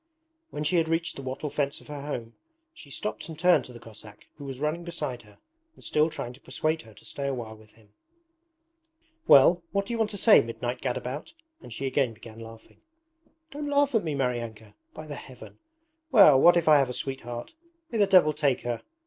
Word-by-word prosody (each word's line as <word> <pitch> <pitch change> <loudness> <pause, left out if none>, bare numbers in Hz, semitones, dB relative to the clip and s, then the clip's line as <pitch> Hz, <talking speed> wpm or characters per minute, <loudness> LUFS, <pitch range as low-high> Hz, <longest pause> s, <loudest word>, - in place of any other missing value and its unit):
When 150 - -5
she 165 +4 +1
had 160 -1 +1
reached 165 +1 -1
the - - -7
wattle 135 +3 -5
fence 140 -1 -2
of - - -18
her 145 -2 -7
home 120 -6 -5 0.4
she 360 +2 -14
stopped 210 -5 -5
and 160 - -8
turned 180 +2 +4
to - - -10
the 120 - -11
Cossack 105 -2 -13
who 145 - -9
was 135 -2 -7
running 155 +4 -2
beside 150 -8 -4
her 105 -1 -20 0.4
and - - -17
still 155 +1 +2
trying 120 -5 -6
to 130 - -18
persuade 155 +1 -1
her 110 -2 -17
to - - -17
stay 140 -1 -4
a 135 - -1
while 110 -3 -7
with 110 -1 -19
him. 105 -2 -24 1.3
'Well, 170 +6 +7
what 200 0 0
do 235 - -5
you 230 - -3
want 220 -1 +1
to 205 - -7
say, 215 +2 +7
midnight 120 +2 -5
gadabout?' 130 - -4 0.3
and - - -12
she 130 +5 -5
again 130 -2 0
began 115 0 -13
laughing. 115 0 -13 0.7
'Don't 290 +1 -5
laugh 285 -1 +2
at 225 - +2
me, 155 -3 -2
Maryanka! 115 -5 -3 0.2
By 155 - -8
the 150 - -7
Heaven! 130 -2 -12 0.5
Well, 175 - +7
what 175 0 +7
if 170 - 0
I 150 -2 +7
have 135 -2 +1
a - - -4
sweetheart? 120 - -6 0.4
May 230 - -2
the 205 - +4
devil 180 -6 +5
take 145 -4 +1
her! 120 -1 -3
140 Hz, 215 wpm, -27 LUFS, 120-165 Hz, 1.3 s, Well